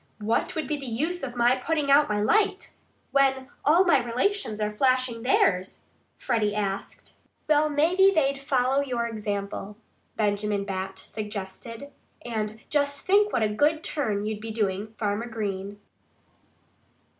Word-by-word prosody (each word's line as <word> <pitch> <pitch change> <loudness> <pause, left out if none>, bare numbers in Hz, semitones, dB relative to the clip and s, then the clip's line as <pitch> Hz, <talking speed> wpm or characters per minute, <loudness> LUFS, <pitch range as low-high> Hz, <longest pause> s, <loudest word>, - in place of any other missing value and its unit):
"What 220 +10 -1
would 315 - -2
be 300 - -1
the 275 -2 -7
use 315 +10 -1
of 250 -2 -5
my 240 +1 +4
putting 290 +2 -1
out 290 -1 +5
my 210 0 0
light, 410 - +1 0.4
when 270 -1 +2
all 330 +6 +5
my 330 -6 +5
relations 245 - -1
are 210 0 -2
flashing 255 -1 +1
theirs?" 195 -6 +1 0.3
Freddie 215 -5 0
asked. 200 -2 -4 0.3
"Well, 305 0 +3
maybe 340 +7 +4
they'd 275 -6 +1
follow 270 -1 +1
your 245 -4 -2
example," 205 -2 -4 0.4
Benjamin 205 -1 0
Bat 190 -1 -4
suggested. 215 +6 -7 0.3
"And 220 -2 -3
just 285 -1 0
think 410 +2 +4
what 230 - +1
a - - +3
good 300 +9 +1
turn 210 -9 -1
you'd 215 -1 -3
be 225 - -6
doing 210 -1 -2
Farmer 210 +2 -1
Green!" 205 -3 -4
235 Hz, 145 wpm, -26 LUFS, 210-285 Hz, 0.4 s, out